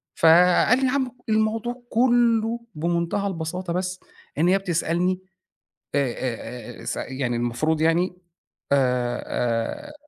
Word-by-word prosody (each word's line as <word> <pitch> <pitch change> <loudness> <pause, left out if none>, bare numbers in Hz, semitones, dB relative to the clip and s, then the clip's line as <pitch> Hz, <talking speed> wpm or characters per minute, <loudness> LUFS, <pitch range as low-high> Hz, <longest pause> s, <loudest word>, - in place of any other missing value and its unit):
فقال 180 +9 +5
لي: 265 - +1
"يا - - +1
عم 260 -2 0 0.2
الموضوع 225 +3 0
كُلّه 235 -1 +3 0.2
بمنتهى 170 +5 -1
البساطة 175 0 -4
بس 185 +1 -2 0.4
إن 160 +3 +3
هي 190 - +5
بتسألني" 180 0 0 0.7
آآ 140 -4 +1 0.6
آآ - - -12
آآ - - -11
س - - -2
يعني 130 -2 -2
المفروض 120 +7 0
يعني 170 +3 +2 0.6
آآ 125 -3 +1 0.7
آآ، - - -12
180 Hz, 125 wpm, -24 LUFS, 160-220 Hz, 0.7 s, فقال